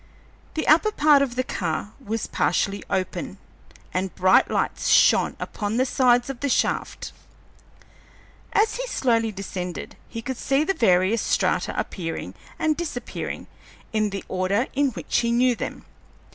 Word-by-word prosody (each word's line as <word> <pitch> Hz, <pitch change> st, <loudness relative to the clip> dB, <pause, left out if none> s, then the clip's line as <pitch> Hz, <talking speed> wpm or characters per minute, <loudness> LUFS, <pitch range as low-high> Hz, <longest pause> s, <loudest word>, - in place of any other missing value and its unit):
The 315 Hz, -, -2 dB
upper 335 Hz, +8 st, +5 dB
part 295 Hz, -6 st, +5 dB
of 260 Hz, -3 st, -1 dB
the 255 Hz, -, +1 dB
car 180 Hz, -2 st, -3 dB
was 225 Hz, -1 st, -2 dB
partially 200 Hz, +3 st, 0 dB
open, 185 Hz, -1 st, -2 dB, 0.6 s
and 185 Hz, 0 st, -2 dB
bright 185 Hz, +1 st, +4 dB
lights -, -, -1 dB
shone -, -, +5 dB
upon 210 Hz, +1 st, -3 dB
the 260 Hz, -, +3 dB
sides 245 Hz, -2 st, +3 dB
of 270 Hz, -3 st, -5 dB
the 285 Hz, -, -1 dB
shaft. -, -, -1 dB, 1.4 s
As 435 Hz, +2 st, +2 dB
he -, -, -3 dB
slowly 230 Hz, -, +1 dB
descended, 185 Hz, -3 st, -6 dB
he 230 Hz, -1 st, -6 dB
could 260 Hz, +1 st, -4 dB
see 275 Hz, +4 st, +1 dB
the 390 Hz, -, +1 dB
various 190 Hz, -, +3 dB
strata -, -, 0 dB
appearing 165 Hz, -4 st, -4 dB, 0.2 s
and 310 Hz, -1 st, +1 dB
disappearing 300 Hz, -7 st, -5 dB, 0.5 s
in 215 Hz, -1 st, +1 dB
the 195 Hz, -1 st, -5 dB
order 190 Hz, +5 st, 0 dB
in 280 Hz, 0 st, +2 dB
which -, -, -1 dB
he 235 Hz, -1 st, 0 dB
knew 245 Hz, +1 st, +3 dB
them. -, -, -6 dB
235 Hz, 145 wpm, -24 LUFS, 195-275 Hz, 1.4 s, upper